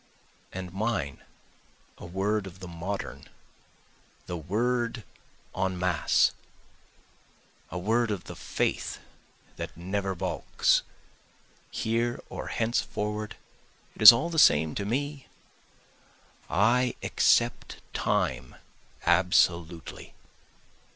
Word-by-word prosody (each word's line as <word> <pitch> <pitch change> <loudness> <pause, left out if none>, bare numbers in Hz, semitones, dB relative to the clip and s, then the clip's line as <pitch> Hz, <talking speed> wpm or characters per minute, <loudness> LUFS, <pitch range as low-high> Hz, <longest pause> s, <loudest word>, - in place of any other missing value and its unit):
And 90 -1 -7
mine 100 -9 -2 0.8
a - - -9
word 95 +3 -1
of 90 -1 -11
the 90 - -8
modern, 90 +4 -5 1.0
the 90 - -5
word 115 +7 -1 0.5
En 95 -1 -1
Masse. 90 -3 +2 1.4
A 90 - -5
word 115 +5 +1
of 100 -4 -3
the - - -9
faith - - -2 0.6
that - - -6
never 95 +2 -2
balks, 95 +1 +1 0.9
Here 115 +2 -1
or - - -6
henceforward 105 -2 -2 0.6
it - - -12
is 110 - +14
all 155 +9 -1
the 160 - +1
same 80 - +5
to 100 - -3
me, 140 +5 -3 1.2
I 120 +6 +2
accept - - +2
Time 65 -1 -1 0.5
absolutely. 85 -1 +1
100 Hz, 95 wpm, -28 LUFS, 90-115 Hz, 1.4 s, is